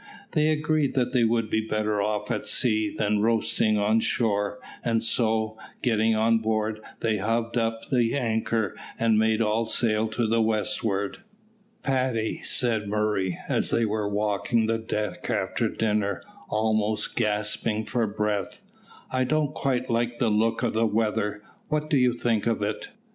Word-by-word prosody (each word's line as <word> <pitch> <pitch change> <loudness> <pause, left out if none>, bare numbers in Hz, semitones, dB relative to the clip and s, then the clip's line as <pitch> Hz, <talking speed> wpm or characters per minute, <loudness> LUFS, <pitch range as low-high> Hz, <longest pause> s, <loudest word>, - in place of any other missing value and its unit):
They 155 0 +2
agreed 155 -2 +1
that 125 -1 +1
they 125 -2 +3
would 115 -1 +2
be 110 - +2
better 105 -1 0
off 105 0 -1
at - - -2
sea 110 -4 +2
than 105 0 0
roasting 110 -1 +2
on 105 +2 +3
shore, 105 -1 0 0.3
and 115 -1 +1
so, 110 -1 +1 0.2
getting 110 -2 +2
on 115 +1 +3
board, 110 -1 -1 0.2
they 110 -2 +1
hove 115 +3 -1
up 115 -1 -1
the 120 -2 +2
anchor 110 -4 0 0.2
and 115 -2 +3
made 110 0 +2
all 110 +1 +1
sail 110 -2 +1
to 115 +2 -1
the 115 +1 +2
westward. 105 -2 -1 0.6
"Paddy," 130 -4 0
said 110 -4 +2
Murray, 105 -3 0
as - - 0
they 115 - +2
were 105 -1 -1
walking 105 +2 0
the 115 0 0
deck 105 -4 -3
after - - 0
dinner, 105 -4 -1 0.3
almost 110 0 0
gasping 105 0 0
for 120 -1 0
breath, 105 -2 -2 0.5
"I 130 0 +1
don't 150 +2 0
quite 130 -2 -1
like 120 0 0
the 120 -4 +1
look 115 +3 +1
of 120 - 0
the 115 +1 +2
weather; 105 -1 -1 0.2
what 155 +1 -2
do 145 - +4
you 125 -2 +3
think 120 -2 0
of 115 -3 0
it?" 105 0 -3
110 Hz, 160 wpm, -26 LUFS, 105-115 Hz, 0.6 s, do